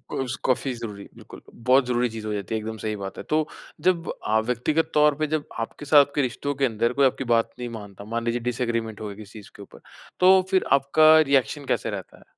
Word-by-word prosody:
उस 130 -1 -2
काफी 130 0 +1
ज़रूरी 105 -4 -7
बिल्कुल, - - -13
बहुत 125 +3 +3
ज़रूरी 120 0 +1
चीज़ 110 -1 -7
हो 105 - -2
जाती 100 +2 -3
है - - -1
एकदम 110 +1 -6
सही 110 0 -3
बात 95 -1 -7
है। - - -6
तो 155 0 +1 0.3
जब 175 -1 +1 0.2
अ, 110 +1 +3
व्यक्तिगत 125 +8 -1
तौर 150 -1 +4
पे 155 +1 -1
जब 155 -1 -2
आपके 115 +6 -6
साथ 145 -1 +6
के 145 - +2
रिश्तों 140 +3 -2
के 135 0 +1
अंदर 115 +1 0
कोई 140 +1 +3
आपकी 135 +1 0
बात 115 0 +2
नहीं 120 -1 -4
मानता, 100 -3 -9
मान 115 +1 -3
लीजिए 120 +1 0
डिसएग्रीमेंट 115 -3 -3
हो 105 - -4
गया 100 - -7
किसी 110 +1 -11
चीज़ 100 - -15
के 100 - -12
ऊपर, 100 - -14 0.4
तो 185 +1 +6
फिर 190 - +3
आपका 155 +3 +6
रिएक्शन 140 -1 +1
कैसे - - -1
रहता - - -7
है? - - -19
125 Hz, 235 wpm, -24 LUFS, 110-145 Hz, 0.4 s, साथ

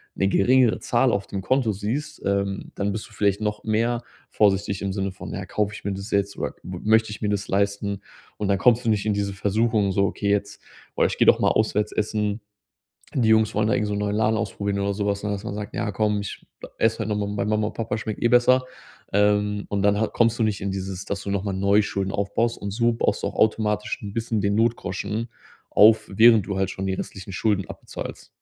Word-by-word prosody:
'ne 95 - +1
geringere 125 +4 +4
Zahl 125 +1 +2
auf 100 -2 -1
dem 100 - -4
Konto 120 +2 +1
siehst, 110 +10 -4
ähm, 100 0 -1
dann 100 0 -1
bist 105 - -6
du - - -19
vielleicht 100 0 +1
noch 105 0 -3
mehr 115 +2 0 0.3
vorsichtig 100 -1 +1
im 100 -1 -2
Sinne 95 -1 -2
von: 95 - -8
„Ja, 95 - -4
kaufe 105 +2 -1
ich - - -9
mir 100 - -2
das 100 +3 -7
jetzt 100 0 0
oder - - -3
m 90 -1 -6
möchte 110 0 +4
ich 105 - -8
mir 105 - 0
das 105 0 -2
leisten?“ 100 0 0 0.4
Und 105 - -2
dann 100 0 +2
kommst 120 +4 +3
du - - +2
nicht 105 -2 +1
in 105 - +1
diese 100 -1 -2
Versuchung, 105 +1 +1
so: 100 +1 +2
„Okay, 100 +1 -2
jetzt, 100 0 -1 0.3
boah, - - +3
ich - - -1
gehe - - +3
doch - - +6
mal - - +4
auswärts 105 -1 +1
essen. 105 0 -1 0.8
Die 120 -5 +2
Jungs 110 -1 +3
wollen 105 0 +2
da 110 - +2
irgend 105 - 0
so 105 - -2
'n 100 - -2
neuen 105 0 -1
Laden 110 0 +2
ausprobieren 100 -2 -2
oder 100 0 0
so 100 +1 -2
was“, 100 0 -1
ne? 105 - -2
Dass 100 0 -4
man 100 - -4
sagt: 105 0 -6
„Ja 115 -3 -1
komm, 105 0 +1
ich 100 - -7 0.3
esse 110 0 +1
heute 110 -1 -2
noch 105 - 0
mal 100 - -4
bei - - 0
Mama 105 0 +1
und - - -6
Papa 115 -1 -3
schmeckt 110 -1 -5
eh - - +4
besser.“ 125 +2 +4 0.5
Ähm, 105 0 +2
und 100 -1 -1
dann 100 +1 +3
ha 110 - +2
kommst 115 0 +1
du - - +3
nicht 105 -2 0
in 100 0 -3
dieses, 95 -1 -5
dass 100 -2 -3
du - - -6
noch 100 -1 -1
mal 100 - -2
neu 100 +2 +3
Schulden 100 -2 -2
aufbaust. 110 +4 -1
Und 100 - -4
so 115 +3 +2
baust 115 - -1
du - - +1
auch - - -7
automatisch 105 -1 +1
'n 100 - -6
bisschen 115 -1 -1
den 100 0 +1
Notgroschen 110 -1 -1 0.4
auf, 110 +1 +5
während 110 -1 +6
du 100 -2 -2
halt 95 -1 0
schon 95 +1 -5
die 95 - 0
restlichen 95 +1 -7
Schulden 100 0 0
abbezahlst. - - -8
105 Hz, 245 wpm, -24 LUFS, 100-110 Hz, 0.8 s, doch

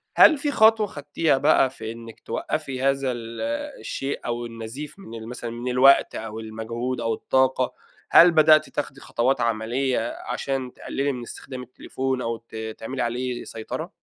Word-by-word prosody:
هل 310 - +8
في 285 +1 -1
خطوة 220 -3 +5
خدتيها 145 -2 0
بقى 135 -1 +4
في 110 -4 -7
إنّك 115 -1 -10
توقفي 130 -1 -3
هذا 135 -1 +2
ال 115 -1 -6 0.4
الشيء 135 +1 -4
أو 120 0 -2
النزيف 115 - -7
من 115 -12 -10
ال 110 0 -8
مثلًا 120 0 -6
من 120 +2 -6
الوقت 130 +2 +5
أو 110 0 -5
المجهود 115 +3 -4
أو 115 -1 0
الطاقة؟ 130 +1 +1 0.4
هل 175 +1 +8
بدأتِ 155 -1 +6
تاخدي 135 -2 -4
خطوات 125 +2 0
عمليّة 115 +2 0
عشان 130 0 -3
تقللي 140 +1 -2
من 125 -2 -5
استخدام 125 +2 -8
التليفون 130 +1 -3
أو 115 -1 -2
ت 110 -1 -7
تعملي 130 +4 -4
عليه 125 +1 -2
سيطرة؟ 110 -1 -6
125 Hz, 160 wpm, -24 LUFS, 115-135 Hz, 0.4 s, هل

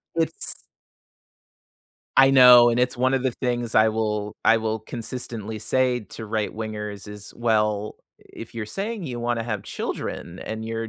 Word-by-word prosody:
It's 165 -1 -1 1.5
I 135 0 +7
know, 125 -2 +9
and 120 - 0
it's 125 0 +1
one 130 +2 +2
of 130 - 0
the 130 - +1
things 120 -1 -3
I 110 0 +6
will 105 -1 -2
I 115 - +6
will 110 -1 -2
consistently 110 -2 -6
say 125 +3 +1
to 110 +1 -9
right-wingers 105 -1 -4
is, 105 0 -9
"Well, 105 -3 0 0.2
if 115 +1 -12
you're 110 -2 -4
saying 200 - -4
you 120 -4 -5
wanna 120 -1 -1
have 105 -4 -3
children 85 +2 -5
and 110 0 -5
you're 115 0 -4
115 Hz, 155 wpm, -24 LUFS, 110-125 Hz, 1.5 s, know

